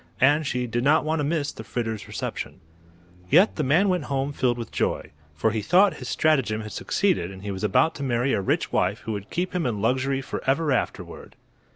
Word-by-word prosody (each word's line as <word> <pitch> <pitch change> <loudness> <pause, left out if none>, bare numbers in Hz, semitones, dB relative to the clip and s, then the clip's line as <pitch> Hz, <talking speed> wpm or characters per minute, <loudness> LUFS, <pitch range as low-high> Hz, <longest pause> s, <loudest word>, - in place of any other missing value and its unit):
And 145 +3 +4
she 125 -1 -1
did 120 +1 -2
not 150 +3 +4
want 160 +1 0
to - - 0
miss 145 -1 -1
the 110 - -9
Fritters' 110 -1 -4
reception. - - -5 0.7
Yet 180 +9 +5
the - - -1
man 155 +9 +3
went 180 -5 0
home 140 0 -2
filled 125 -3 +1
with 115 - -6
joy; - - -1 0.2
for 110 +9 +1
he 110 0 -1
thought 185 - +4
his - - -7
stratagem 135 -9 +1
had 110 -1 -8
succeeded 185 - 0
and 95 0 -11
he 105 - -3
was 95 +1 -5
about 130 - +3
to - - -8
marry 130 0 +1
a 100 - +1
rich 95 - 0
wife 95 +4 +1
who 110 - -5
would 100 -1 -5
keep 180 +2 -2
him 175 -7 0
in 110 -4 -2
luxury 130 +5 +1
forever 145 +4 -1
afterward. 130 - -3
130 Hz, 215 wpm, -25 LUFS, 110-155 Hz, 0.7 s, Yet